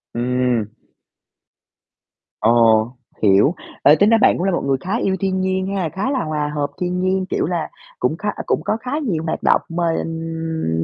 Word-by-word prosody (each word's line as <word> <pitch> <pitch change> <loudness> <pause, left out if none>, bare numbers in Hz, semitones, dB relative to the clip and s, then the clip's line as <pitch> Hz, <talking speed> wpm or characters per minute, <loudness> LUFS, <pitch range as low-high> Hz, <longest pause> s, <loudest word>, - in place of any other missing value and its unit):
Ừm. 125 -2 0 1.7
Ồ, 115 -1 +4 0.4
hiểu. 105 - +4 0.3
Ê, 150 - +7
tính 205 +4 +4
ra 225 - +5
bạn - - +4
cũng - - -2
là 195 - +2
một 175 - 0
người 135 -1 +1
khá 195 +5 -1
yêu 195 -5 0
thiên 190 0 0
nhiên 190 0 -1
ha, 180 -5 -1
khá 195 - -3
là 265 -3 0
hòa 150 -1 -2
hợp 145 -1 0
thiên 180 0 -1
nhiên, 185 0 0
kiểu - - 0
là, 175 -2 -2 0.3
cũng 155 +6 0
khá 210 - -2
ơ, - - -5
cũng - - 0
có 215 - 0
khá 250 +2 -7
nhiều 185 - -2
hoạt 160 - -3
động - - +4
mà, 170 +1 -2
ừm, 160 - -3
165 Hz, 195 wpm, -20 LUFS, 130-190 Hz, 1.7 s, Ê